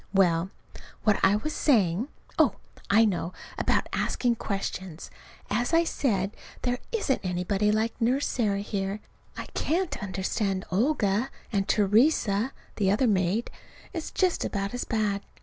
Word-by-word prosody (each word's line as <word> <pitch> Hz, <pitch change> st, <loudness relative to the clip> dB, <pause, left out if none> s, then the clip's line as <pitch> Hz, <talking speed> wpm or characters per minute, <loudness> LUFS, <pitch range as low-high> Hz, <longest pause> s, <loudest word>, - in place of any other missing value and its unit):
Well, 175 Hz, -2 st, +3 dB, 0.5 s
what 210 Hz, -2 st, +3 dB
was 205 Hz, +5 st, +3 dB
I -, -, -7 dB
saying? 215 Hz, -, +2 dB, 0.3 s
Oh, -, -, +5 dB, 0.3 s
I 220 Hz, +3 st, +6 dB
know 180 Hz, -3 st, -1 dB, 0.3 s
about -, -, +1 dB
asking 240 Hz, -2 st, +1 dB
questions. 190 Hz, -5 st, -4 dB, 0.4 s
As 240 Hz, +9 st, +1 dB
I 335 Hz, -, +5 dB
said, 205 Hz, -, 0 dB, 0.3 s
there 245 Hz, -1 st, 0 dB
isn't 410 Hz, -, +1 dB
anybody 190 Hz, +3 st, +1 dB
like 220 Hz, +2 st, -1 dB
Nurse 255 Hz, +5 st, +2 dB
Sarah 205 Hz, -5 st, 0 dB
here. 200 Hz, 0 st, -3 dB, 0.4 s
I -, -, -4 dB
can't 350 Hz, +3 st, -1 dB
understand 195 Hz, 0 st, -1 dB
Olga, 220 Hz, +1 st, +1 dB, 0.2 s
and 195 Hz, -1 st, +1 dB
Theresa, 215 Hz, +1 st, +3 dB, 0.3 s
the 195 Hz, -3 st, +2 dB
other 210 Hz, +7 st, +3 dB
maid, 200 Hz, +1 st, +1 dB, 0.4 s
is 330 Hz, -3 st, -4 dB
just 370 Hz, -2 st, +1 dB
about 200 Hz, 0 st, -2 dB
as 245 Hz, -, -3 dB
bad. 210 Hz, -3 st, 0 dB
210 Hz, 135 wpm, -27 LUFS, 195-245 Hz, 0.5 s, I